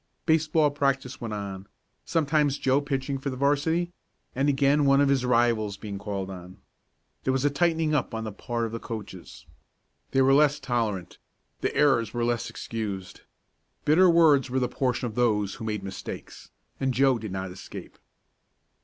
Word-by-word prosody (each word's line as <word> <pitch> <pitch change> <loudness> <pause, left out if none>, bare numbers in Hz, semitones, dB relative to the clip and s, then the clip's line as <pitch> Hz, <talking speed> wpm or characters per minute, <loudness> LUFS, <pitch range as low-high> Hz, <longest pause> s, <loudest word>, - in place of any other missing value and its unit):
Baseball 155 -2 +3
practice 135 -3 -1
went 115 -2 -4
on, 100 -1 -6 0.4
sometimes 150 -3 +1
Joe 135 +1 +2
pitching 135 -1 -2
for 140 - -3
the 130 - -4
'varsity, 145 +5 +1 0.4
and 135 +3 +1
again 140 +1 +3
one 140 0 +5
of 140 -1 +4
his 135 -2 +2
rivals 115 -4 +2
being 100 -2 -6
called 100 -2 -4
on. 90 0 -10 0.7
There 130 - +1
was 135 +1 0
a 145 - +3
tightening 160 0 +1
up 130 -5 0
on 110 - -3
the 110 - -4
part 115 +3 -3
of 115 - -5
the 115 - -4
coaches 95 -11 -8 0.6
they 135 - +3
were 135 +1 +5
less 150 +1 +4
tolerant 115 -9 -2 0.4
the - - -2
errors 120 -7 +3
were 120 0 0
less 120 -1 -1
excused. 100 -5 -5 0.6
Bitter 180 +5 +6
words 155 -6 +5
were 130 - -1
the 125 -1 +1
portion 125 -1 -1
of 115 - -4
those 105 -4 +1
who 110 - -7
made 105 -2 -3
mistakes, 95 -1 -8 0.3
and 130 -2 0
Joe 135 -2 +3
did 110 -3 -6
not 95 -1 -4
escape. 90 - -10
130 Hz, 170 wpm, -26 LUFS, 110-145 Hz, 0.7 s, Bitter